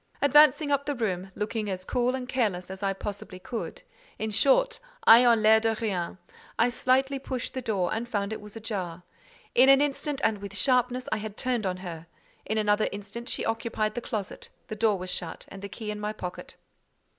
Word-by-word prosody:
Advancing 295 +1 +5
up 280 0 +1
the 290 - 0
room, 190 -6 -2
looking 210 0 -2
as 185 -1 -4
cool 250 +3 +1
and 255 -1 -5
careless 210 -9 -1
as 190 - -8
I 195 -1 +1
possibly 195 -1 -6
could, 225 +5 -6 0.3
in 220 0 -3
short, 460 - +3 0.3
ayant 230 -1 +8
l'air 220 +1 +7
de 225 0 +1
rien, 190 -7 -2 0.4
I 230 +2 +4
slightly 265 +2 +1
pushed 260 -2 -4
the 260 - -3
door 205 -6 0
and 235 +2 -3
found 205 -1 -1
it 220 - -6
was 210 0 -12
ajar. 190 -6 -5 0.5
In 260 +2 +6
an 275 0 +8
instant, 290 0 -1
and 215 -2 +2
with 200 0 -7
sharpness, 250 +2 +2
I - - +1
had 215 -1 -6
turned 245 -5 0
on 180 -1 -2
her. 165 -1 -7 0.4
In 220 - -1
another 210 0 +2
instant 205 +5 -7
she - - -2
occupied 225 -1 -1
the 240 - -4
closet, 210 -4 -5 0.2
the 215 - -4
door 215 -1 +2
was 185 0 -5
shut, 165 -3 -5
and 195 - -10
the 200 - -6
key 215 -1 -5
in 210 - -5
my 210 +1 -3
pocket. 180 -4 -7
220 Hz, 200 wpm, -27 LUFS, 200-250 Hz, 0.5 s, ayant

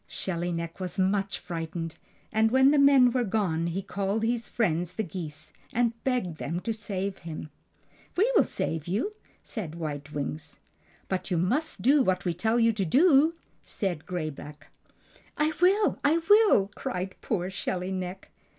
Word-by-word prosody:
Shelly 175 -1 -3
Neck 170 +1 -4
was 185 -1 -4
much 195 +1 +1
frightened, 165 -2 -5 0.4
and 220 +1 +3
when 265 +3 +5
the 295 - +4
men 275 -3 +6
were 250 0 +1
gone 190 -6 0
he 185 +3 -3
called 200 +3 -2
his 230 0 0
friends 175 -5 0
the 220 - -2
geese, 155 -5 -7 0.2
and 235 -1 +1
begged 235 -12 -1
them 165 +4 -2
to 225 - -2
save 200 -2 -4
him. 155 -2 -7 0.7
"We 435 +7 +4
will - - +7
save 160 -1 -3
you," 215 - -1 0.3
said 175 -9 -6
White 145 -3 -5
Wings. 150 +1 -5 0.5
"But 190 +1 -2
you 180 - +1
must 255 - -1
do 275 +4 +5
just 265 - +2
what 185 0 +1
we 175 - +1
tell 220 +7 +1
you 230 -1 +4
to 205 -2 -1
do!" 300 - +5 0.3
said 180 -7 -3
Gray 170 -4 -2
Back. 150 +1 -12 0.7
"I 305 +1 +2
will! 395 +4 +4
I 300 +3 +4
will!" 410 - +5
cried 185 -1 -4
poor 185 -3 -2
Shelly 185 0 -3
Neck. 185 0 -5
190 Hz, 170 wpm, -28 LUFS, 170-240 Hz, 0.7 s, will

